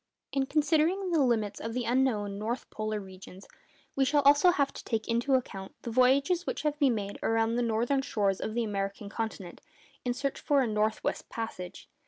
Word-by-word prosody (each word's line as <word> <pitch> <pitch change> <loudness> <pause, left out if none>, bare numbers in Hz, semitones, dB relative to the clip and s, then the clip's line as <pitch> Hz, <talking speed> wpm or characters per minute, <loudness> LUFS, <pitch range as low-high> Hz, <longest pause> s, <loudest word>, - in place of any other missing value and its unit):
In 270 -1 0
considering 320 +6 +2
the 325 -3 +3
limits 220 -6 +1
of 225 +1 -5
the 250 - 0
unknown 225 -5 +1
north 230 +4 -3
polar 215 0 -3
regions, 190 -1 -12 0.5
we 275 - +3
shall 285 +2 +3
also 285 +5 +6
have 280 -5 +1
to - - -9
take 225 -2 -2
into 240 +4 +2
account 195 -7 -4
the 235 - -4
voyages 275 +9 +3
which - - -3
have 300 -1 -1
been 270 -5 +4
made 200 -1 -5
around 225 0 +1
the 240 - +1
northern 235 +4 +1
shores 205 -8 0
of 220 - -3
the 240 - +1
American 200 -1 -3
continent 205 -5 -5 0.4
in 245 - 0
the - - -11
search 275 0 -2
for 285 -3 +2
a - - 0
'north 215 0 0
west - - -3
passage. 205 -6 -6
235 Hz, 200 wpm, -29 LUFS, 215-275 Hz, 0.5 s, also